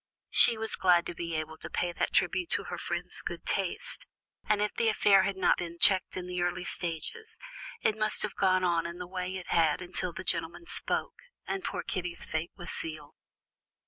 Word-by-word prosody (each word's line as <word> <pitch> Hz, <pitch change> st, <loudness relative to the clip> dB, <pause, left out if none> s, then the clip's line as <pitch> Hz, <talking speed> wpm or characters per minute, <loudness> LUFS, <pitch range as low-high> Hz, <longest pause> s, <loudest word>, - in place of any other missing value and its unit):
She 235 Hz, -, +6 dB
was 220 Hz, 0 st, +2 dB
glad 175 Hz, -2 st, +4 dB
to -, -, -4 dB
be 170 Hz, -1 st, -4 dB
able 160 Hz, 0 st, -4 dB
to -, -, -7 dB
pay 175 Hz, -, -1 dB
that -, -, -1 dB
tribute 360 Hz, -2 st, +1 dB
to -, -, 0 dB
her -, -, -6 dB
friend's -, -, -2 dB
good -, -, -6 dB
taste. -, -, -1 dB, 0.4 s
And 210 Hz, -1 st, +3 dB
if 210 Hz, 0 st, 0 dB
the 230 Hz, -1 st, +2 dB
affair 205 Hz, -2 st, +5 dB
had 190 Hz, 0 st, -1 dB
not 190 Hz, -, +3 dB
been 170 Hz, -1 st, -5 dB
checked 185 Hz, +1 st, +4 dB
in 180 Hz, -1 st, -5 dB
its 180 Hz, 0 st, -3 dB
early 175 Hz, +1 st, -1 dB
stages, 435 Hz, -, 0 dB, 0.4 s
it 215 Hz, -, +2 dB
must 215 Hz, 0 st, +2 dB
have 210 Hz, -, -2 dB
gone 185 Hz, -1 st, +2 dB
on 170 Hz, -2 st, +1 dB
in 170 Hz, +1 st, -7 dB
the 180 Hz, -, -6 dB
way 185 Hz, +1 st, -4 dB
it 180 Hz, -, -8 dB
had 160 Hz, -3 st, +3 dB
until 180 Hz, 0 st, -1 dB
the 185 Hz, -, -7 dB
gentleman 170 Hz, -, -2 dB
spoke, -, -, -3 dB, 0.3 s
and 390 Hz, -, -3 dB
poor -, -, -3 dB
Kitty's 180 Hz, -3 st, -4 dB
fate 160 Hz, +2 st, -3 dB
was 175 Hz, -, -7 dB
sealed. 155 Hz, -3 st, -5 dB
180 Hz, 205 wpm, -30 LUFS, 170-200 Hz, 0.4 s, She